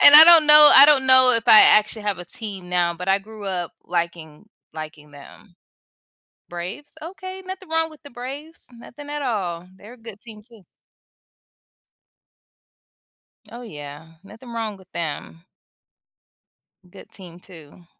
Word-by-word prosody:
and 285 Hz, -, +8 dB
I 310 Hz, -, +11 dB
don't 330 Hz, -2 st, +6 dB
know 300 Hz, 0 st, +8 dB
I 275 Hz, -, +9 dB
don't 275 Hz, -3 st, +2 dB
know 260 Hz, -1 st, +5 dB
if 230 Hz, -1 st, -2 dB
I 215 Hz, -, +7 dB
actually 215 Hz, +1 st, +2 dB
have 205 Hz, -3 st, -4 dB
a 175 Hz, -, -9 dB
team 195 Hz, -2 st, -8 dB
now, 175 Hz, -1 st, -1 dB
but 180 Hz, +2 st, -9 dB
I 195 Hz, +1 st, +2 dB
grew 215 Hz, +1 st, -14 dB
up 180 Hz, -3 st, -6 dB
liking 170 Hz, -1 st, -6 dB, 0.3 s
liking 155 Hz, -1 st, -11 dB
them. 145 Hz, +6 st, -18 dB, 0.9 s
Braves? 180 Hz, +12 st, -9 dB
Okay, 375 Hz, +2 st, -10 dB
nothing 375 Hz, -1 st, -10 dB
wrong 325 Hz, 0 st, -2 dB
with 310 Hz, -, -18 dB
the 285 Hz, -, -13 dB
Braves. 275 Hz, +7 st, -8 dB
Nothing 245 Hz, +5 st, -15 dB
at 295 Hz, 0 st, -6 dB
all. 180 Hz, -8 st, -5 dB
They're 210 Hz, +5 st, -16 dB
a -, -, -20 dB
good 225 Hz, -3 st, -14 dB
team 215 Hz, -3 st, -15 dB
too. 230 Hz, -4 st, -20 dB, 2.9 s
Oh, 240 Hz, -, -11 dB
yeah. 150 Hz, -5 st, -12 dB
Nothing 225 Hz, +5 st, -15 dB
wrong 220 Hz, -3 st, -6 dB
with 190 Hz, -1 st, -23 dB
them. 165 Hz, 0 st, -8 dB, 1.5 s
Good -, -, -17 dB
team 180 Hz, -3 st, -13 dB
too. 175 Hz, -2 st, -17 dB
210 Hz, 150 wpm, -20 LUFS, 175-265 Hz, 2.9 s, I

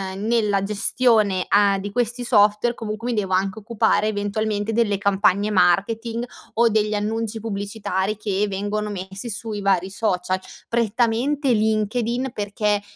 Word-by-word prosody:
uhm, 200 Hz, +2 st, -5 dB
nella 210 Hz, -4 st, +1 dB
gestione 210 Hz, -2 st, +2 dB
a 200 Hz, -1 st, +4 dB
di 200 Hz, +1 st, -5 dB
questi 240 Hz, +2 st, -1 dB
software, 210 Hz, +1 st, +3 dB
comunque, 225 Hz, +1 st, -4 dB
mi -, -, -1 dB
devo 190 Hz, -2 st, -2 dB
anche 195 Hz, +3 st, 0 dB
occupare, 215 Hz, -1 st, +1 dB
eventualmente, 210 Hz, +1 st, -2 dB
delle 215 Hz, -3 st, +1 dB
campagne 200 Hz, +1 st, +2 dB
marketing, 220 Hz, +6 st, +1 dB, 0.3 s
o 235 Hz, +1 st, +4 dB
degli 215 Hz, -1 st, +1 dB
annunci 220 Hz, +1 st, -2 dB
pubblicitari 200 Hz, -1 st, -3 dB
che 210 Hz, -1 st, -1 dB
vengono 205 Hz, +2 st, -2 dB
messi 195 Hz, +3 st, -6 dB
sui 220 Hz, -1 st, -4 dB
vari 190 Hz, -1 st, +1 dB
social. 185 Hz, -3 st, -1 dB, 0.3 s
Prettamente 235 Hz, +5 st, +1 dB
LinkedIn 225 Hz, +4 st, 0 dB
perché, 205 Hz, 0 st, -1 dB
210 Hz, 135 wpm, -22 LUFS, 200-225 Hz, 0.3 s, a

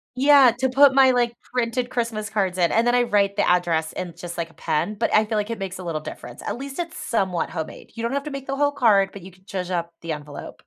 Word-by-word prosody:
Yeah, 275 Hz, -1 st, +6 dB
to 260 Hz, 0 st, +1 dB
put 275 Hz, +1 st, +6 dB
my, 265 Hz, -1 st, +6 dB
like, 240 Hz, -1 st, 0 dB, 0.2 s
printed 245 Hz, 0 st, -1 dB
Christmas 230 Hz, -4 st, -2 dB
cards 190 Hz, -4 st, -1 dB
in, 170 Hz, -2 st, +3 dB
and 230 Hz, +2 st, +3 dB
then 240 Hz, -, +3 dB
I 245 Hz, -, +4 dB
write 200 Hz, -3 st, +1 dB
the -, -, +2 dB
address 170 Hz, -3 st, +1 dB
in 180 Hz, -2 st, -5 dB
just, 175 Hz, -1 st, -7 dB
like, 170 Hz, -1 st, -3 dB
a -, -, -20 dB
pen, 205 Hz, +8 st, -1 dB
but -, -, 0 dB
I 215 Hz, -, +6 dB
feel 215 Hz, 0 st, -2 dB
like 210 Hz, +1 st, -1 dB
it 230 Hz, -, -3 dB
makes 190 Hz, -1 st, -5 dB
a -, -, -7 dB
little 160 Hz, -3 st, -3 dB
difference, -, -, -9 dB
at -, -, -3 dB
least 275 Hz, +3 st, -7 dB
it's 340 Hz, -1 st, -4 dB
somewhat 195 Hz, -, -1 dB
homemade, 160 Hz, -2 st, -7 dB
you 230 Hz, -, -5 dB
don't 235 Hz, -, -1 dB
have 280 Hz, 0 st, -1 dB
to 300 Hz, -, -5 dB
make 275 Hz, -1 st, -6 dB
the 275 Hz, 0 st, -3 dB
whole 290 Hz, 0 st, +2 dB
card, 205 Hz, -8 st, +3 dB
but 200 Hz, -, -9 dB
you 185 Hz, +2 st, -11 dB
could 185 Hz, +2 st, -25 dB
zhuzh 185 Hz, -3 st, -4 dB
up 170 Hz, -1 st, -2 dB
the 165 Hz, -, -5 dB
envelope. 150 Hz, -1 st, -8 dB
215 Hz, 275 wpm, -23 LUFS, 180-255 Hz, 0.2 s, Yeah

